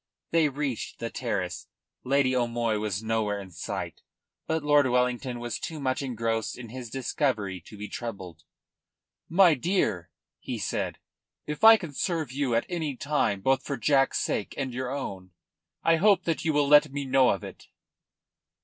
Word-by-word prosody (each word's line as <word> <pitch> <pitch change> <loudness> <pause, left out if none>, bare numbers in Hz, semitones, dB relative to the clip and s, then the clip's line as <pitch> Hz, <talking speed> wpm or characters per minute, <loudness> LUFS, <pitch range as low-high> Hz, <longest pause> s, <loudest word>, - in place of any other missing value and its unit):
They 165 -2 +4
reached 140 -3 -4
the 115 - -5
terrace. 100 -8 -3 0.4
Lady 130 -1 +2
O'Moy 120 -3 0
was 105 0 -2
nowhere 110 -2 0
in 95 -2 -10
sight. 80 - -5 0.5
But 160 -1 -1
Lord 145 -2 +4
Wellington 125 0 0
was 120 -1 -4
too 160 -2 -5
much 130 +1 -1
engrossed 115 -4 -2
in 120 -2 -9
his 125 0 -7
discovery 110 - -1
to 105 - -11
be 105 +1 -6
troubled. 100 -6 -7 0.9
"My 175 0 +6
dear," 120 - 0 0.3
he - - -5
said, - - -2 0.5
"if 150 +6 -5
I 225 0 +10
can 170 -8 -8
serve 160 -3 -1
you 135 -3 0
at 115 - +1
any 160 -6 -3
time, 140 -9 0
both 135 +4 +2
for 140 - -3
Jack's 135 +2 +3
sake 105 - -2
and 135 -3 -3
your 125 +1 -3
own, 95 -10 -5 0.5
I 165 0 +4
hope 200 +3 +4
that 165 -2 -1
you 165 - +1
will 145 -1 +2
let 150 0 +6
me 140 0 -3
know 130 -1 +4
of 95 - 0
it." - - -10
130 Hz, 165 wpm, -27 LUFS, 115-145 Hz, 0.9 s, I